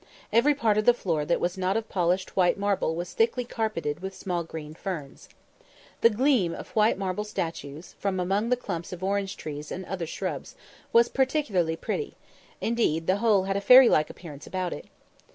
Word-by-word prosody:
Every 280 +6 +4
part 220 -5 +2
of 215 - -1
the 245 - +6
floor 165 -9 -1
that 170 - +1
was 175 +2 -2
not 190 +3 +1
of 225 0 -3
polished 180 0 0
white 180 -2 +3
marble 200 -5 0
was 175 +1 -5
thickly 235 +2 +1
carpeted 215 -11 -2
with 190 +1 -6
small 175 -3 -2
green 155 -2 -8
ferns. 160 -5 -7 0.7
The 230 - +7
gleam 230 -6 +2
of - - -9
white 215 0 +4
marble 195 +1 -2
statues, 165 -6 -5
from 195 -2 -1
among 195 +5 0
the 250 - +3
clumps 175 -8 -5
of 180 0 -7
orange 195 0 -1
trees 150 -1 -7
and 185 +1 -5
other 180 -3 -4
shrubs, - - -5 0.4
was 235 0 +6
particularly 245 - +1
pretty; 435 - -4 0.5
indeed, 220 -9 0
the 185 +3 +2
whole 210 -3 +3
had 195 0 -2
a - - -2
fairy 250 +4 +8
like 155 - +3
appearance 150 -4 -10
about 185 0 -2
it. - - -9
190 Hz, 190 wpm, -27 LUFS, 170-220 Hz, 0.7 s, fairy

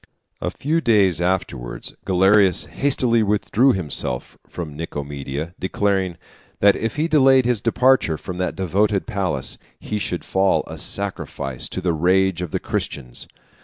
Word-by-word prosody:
A - - -1
few 160 +4 -1
days 100 - +3
afterwards 85 -9 -2
Galerius 95 0 +4
hastily 115 - +1
withdrew 105 +5 +2
himself 75 -8 -2
from 80 -4 -7
Nicomedia, 75 0 -5
declaring, 95 -2 0 0.4
that 100 0 +5
if 115 - -3
he 155 +2 0
delayed 135 -5 +5
his 120 -4 +1
departure 120 -8 +3
from 90 +2 -7
that 90 0 -2
devoted 100 +2 +1
palace, 90 -9 -2 0.2
he 105 - -3
should 90 -3 -3
fall 95 0 +2
a - - -9
sacrifice 70 -9 -3
to 95 - -4
the 90 -2 +1
rage 90 +2 +2
of 90 - -3
the - - -2
Christians. 60 -4 -4
95 Hz, 140 wpm, -21 LUFS, 85-105 Hz, 0.4 s, that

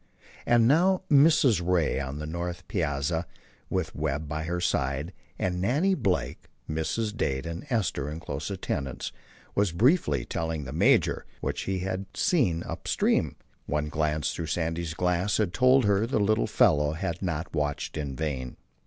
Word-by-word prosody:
And 120 -1 +5
now 180 +7 +4
Mrs. 140 - +5
Ray, 85 -5 +1
on 65 +1 -4
the 75 - -5
north 85 +1 -5
piazza, 80 -1 -1 0.4
with 85 -4 -1
Webb 75 0 -2
by 75 +1 -3
her 90 +2 -2
side 70 0 -1 0.2
and 90 -1 -1
Nannie 145 - +2
Blake, 95 - -1 0.2
Mrs. 105 +8 -2
Dade 65 -7 -1
and 85 - -6
Esther 95 - 0
in 75 +2 -5
close 75 -1 -5
attendance, 75 -9 -3 0.4
was 100 -3 +2
briefly 125 - +2
telling 80 -2 -3
the 65 - -7
major - - +3
what - - -3
she 95 -1 -2
had 95 +1 -3
seen 115 - +2
up - - -7
stream. - - +1 0.3
One 75 0 -1
glance 75 0 0
through 80 - -4
Sandy's 80 0 -2
glass 90 +3 +1
had 105 -5 0
told 130 0 +5
her 100 +2 +2
the 130 - 0
little 105 - +2
fellow 75 +1 +3
had 85 +1 -3
not 85 -2 -3
watched 75 -2 -2
in 70 -4 -3
vain. 65 -5 -3
85 Hz, 160 wpm, -27 LUFS, 75-100 Hz, 0.4 s, And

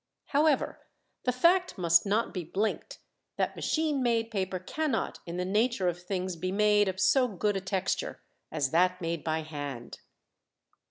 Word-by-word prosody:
However, 295 0 +2 0.5
the 250 - +3
fact 345 +7 +3
must 170 +1 +4
not 215 +4 +1
be 180 - -3
blinked 200 +7 -2 0.4
that - - 0
machine 310 -3 0
made 230 -2 +1
paper 190 -3 -1
cannot 300 - -2
in 170 +1 -4
the 180 - -1
nature 210 0 +1
of 175 0 -2
things 185 0 -3
be 185 +3 -3
made 210 0 +4
of 190 0 -3
so 230 +7 +4
good 205 -1 -1
a 195 - -1
texture 190 0 -2 0.3
as 135 -2 -1
that 180 +2 +3
made 165 -3 -3
by 160 0 -1
hand. 145 -6 -7
190 Hz, 160 wpm, -29 LUFS, 175-230 Hz, 0.5 s, must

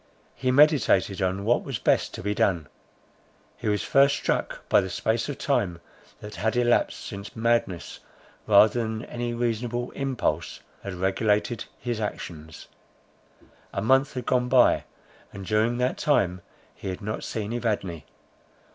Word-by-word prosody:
He 130 - -2
meditated 130 - +4
on 95 +2 -1
what 120 +2 +2
was 135 -5 -3
best - - +1
to - - -7
be 105 +1 0
done. 90 -6 +1 0.9
He - - -6
was 105 -1 0
first 140 +1 +4
struck - - -2
by - - +5
the 95 - -4
space 110 +7 -1
of 140 - -4
time 100 - 0 0.4
that 105 -3 -9
had 110 +5 0
elapsed, 120 -1 +1
since 100 +1 -8
madness, 115 -6 0 0.5
rather 110 +2 +6
than 110 0 -4
any 120 0 -4
reasonable 120 +1 -2
impulse, 135 -3 -2 0.2
had 100 -2 -6
regulated 105 +5 0
his 120 -3 -3
actions. 80 -6 -6 1.0
A 100 - -3
month 135 +5 +3
had 125 -2 -4
gone 125 -1 +1
by, 125 -1 +4 0.5
and 100 -1 -8
during 110 +4 +1
that 125 +1 0
time 90 -11 +1 0.3
he - - -9
had 95 -1 -4
not 105 +1 -4
seen 110 0 -4
Evadne. 105 -9 -2
110 Hz, 145 wpm, -26 LUFS, 100-120 Hz, 1.0 s, rather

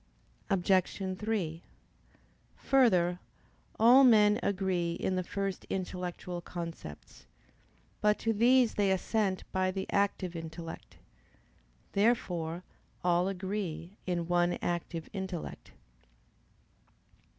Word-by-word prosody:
Obj. 190 0 +1
3: 190 -7 -2 1.0
Further, 180 -10 +3 0.6
all 245 +5 +8
men 210 -3 +6
agree 185 -3 0
in 185 - -1
the 185 - +1
first 195 0 -3
intellectual 180 -1 -4
concepts. 165 - -8 0.7
But 210 0 +3
to 225 - 0
these 245 +2 +4
they 200 -1 +2
assent 190 0 0
by 185 0 +1
the 190 0 -3
active 200 -3 0
intellect. 165 0 -8 0.9
Therefore 180 -6 0 0.4
all 175 +1 +3
agree 190 -3 -4 0.2
in 175 -2 -1
one 175 0 +2
active 170 -1 -3
intellect. 190 -4 -6
185 Hz, 95 wpm, -31 LUFS, 175-205 Hz, 1.0 s, all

